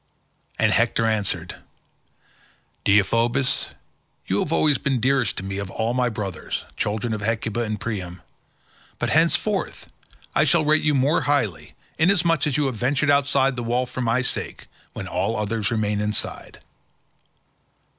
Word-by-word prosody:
And - - +3
Hector 115 - +2
answered, 100 -6 -1 1.3
"Deiphobus, 115 +6 +2 0.6
you 95 - 0
have 155 - -2
always 150 -4 +3
been 135 -3 0
dearest 130 -3 +1
to - - -3
me 95 0 -4
of 100 -1 -5
all 115 +4 -1
my 125 -1 +1
brothers, 100 -5 -5
children 110 +2 -2
of 105 - -4
Hecuba 115 +1 -1
and 110 -2 -3
Priam, 90 -6 -5 0.7
but - - -1
henceforth 170 +5 0 0.4
I - - +4
shall 170 -3 +3
rate 155 +1 +4
you 150 -1 +2
yet 130 - +3
more 145 +5 +2
highly, 120 - -1 0.2
inasmuch 165 -3 +3
as 140 -2 0
you 150 - +1
have 130 -4 -2
ventured 140 +5 +1
outside 140 -1 +3
the 120 - -4
wall 120 +2 0
for 125 +1 -6
my 120 +2 +1
sake - - -3 0.3
when - - -6
all 95 +5 -1
the - - -3
others 105 0 -1
remain 105 -2 0
inside." 105 0 -4
120 Hz, 155 wpm, -23 LUFS, 105-140 Hz, 1.3 s, I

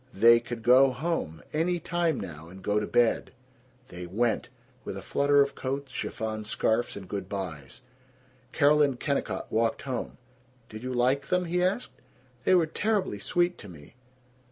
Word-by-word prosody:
They 115 +4 +7
could 120 -1 -7
go 130 +3 +7
home, 130 - -3
any 170 +3 +1
time 170 -3 0
now, 80 0 -8
and 95 +2 -12
go 105 +1 +1
to 105 - -3
bed! 120 -1 +2 0.6
They 90 0 -7
went, 110 +5 0 0.3
with - - -5
a - - -6
flutter 140 0 +3
of 140 - -5
coats, 135 +1 -4
chiffon 110 -4 -4
scarfs, 110 +2 0
and 95 -2 -8
good 100 +1 -5
bys. 85 - -6 0.7
Carol 150 0 +4
and 140 -4 +2
Kennicott 140 -1 -2
walked 115 +1 +1
home. 130 -3 -4 0.5
"Did 110 0 -8
you 130 +1 -4
like 130 +3 +1
them?" 180 0 +1
he 180 +1 0
asked. 190 +7 0 0.5
"They 185 - +5
were 175 -2 +4
terribly 195 - -1
sweet 175 - 0
to 100 - -10
me." 75 -1 -13
125 Hz, 165 wpm, -28 LUFS, 105-155 Hz, 0.7 s, They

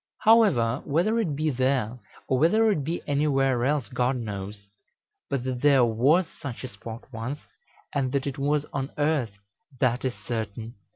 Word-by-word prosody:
However, 175 - +4
whether 180 +10 +1
it 170 -11 -1
be 155 +1 0
there, 130 -2 0 0.3
or 130 - +1
whether 215 +8 +4
it 155 -8 -1
be 165 +5 -3
anywhere 135 -4 +1
else, 140 -3 +1
God 125 +3 0
knows; 100 -3 -6 0.6
but 140 -3 -1
that 125 -1 -3
there 140 -4 +5
was 135 +11 +3
such 135 -7 -8
a - - -3
spot 115 +1 -9
once, 125 +6 -4 0.5
and 135 -3 0
that 140 -1 0
it 140 0 -4
was 145 +1 +1
on 135 -1 -2
earth, 145 -7 +1 0.5
that 125 -1 +1
is 130 -2 -1
certain." 110 0 -5
135 Hz, 165 wpm, -26 LUFS, 120-150 Hz, 0.6 s, there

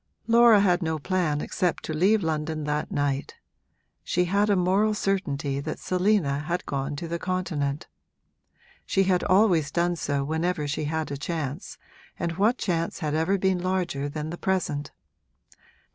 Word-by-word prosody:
Laura 230 -2 +6
had 180 -2 +3
no 160 -2 -1
plan 155 -2 0
except 180 -4 -1
to 155 - -4
leave 195 +6 +3
London 155 -1 -2
that 150 0 -2
night; 145 -1 -1 0.7
she 180 0 +1
had 200 +4 +1
a 205 - +4
moral 195 +4 +2
certainty 145 -9 -1
that 140 - -4
Selina 180 -6 +1
had 170 +4 -3
gone 140 +1 -3
to 165 +4 -5
the 170 +1 -3
Continent. 165 -6 -2 1.0
She 195 - +1
had 185 -1 +2
always 185 -6 +3
done 175 0 0
so 145 -3 -1
whenever 160 +1 -1
she 150 +1 -2
had 160 0 -2
a 140 - -3
chance, 150 +1 -4 0.4
and 170 -2 -3
what 220 +6 +3
chance 170 -3 -1
had 150 -2 -2
ever 165 +6 +1
been 190 -1 +1
larger 175 -6 -1
than 150 +2 -5
the 175 - -7
present? 155 -6 -1
170 Hz, 160 wpm, -26 LUFS, 150-185 Hz, 1.0 s, Laura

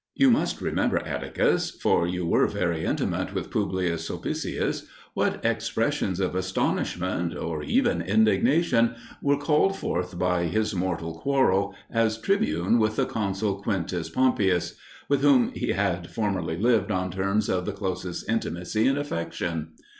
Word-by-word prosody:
You 270 -2 +5
must 235 - +1
remember, - - +1
Atticus, - - 0
for 85 - +1
you 90 0 -2
were 85 - +3
very 85 -3 -1
intimate - - -1
with - - -3
Publius 85 -3 -1
Sulpicius, - - -3 0.3
what - - -1
expressions 95 -1 0
of 95 -2 0
astonishment, 90 -1 -1
or 80 -2 -3
even 80 +3 +1
indignation, 115 - +3 0.3
were 140 0 +2
called 150 +6 +2
forth 90 - -3
by 90 -1 +1
his 110 +6 0
mortal 85 -3 -3
quarrel, 100 -8 +2 0.2
as 115 -1 +1
tribune, 195 - +1
with 110 0 +1
the - - +2
consul 100 -1 -2
Quintus 90 -5 -2
Pompeius, 105 -9 +2 0.3
with 140 -1 +2
whom 140 -4 +5
he - - -3
had 90 -4 -1
formerly 95 -7 -2
lived 115 +3 +2
on 90 0 -1
terms 100 +3 0
of 90 -1 0
the - - 0
closest 95 -3 -4
intimacy 110 0 0
and 135 +1 +2
affection. 85 - -3
95 Hz, 140 wpm, -26 LUFS, 90-115 Hz, 0.3 s, You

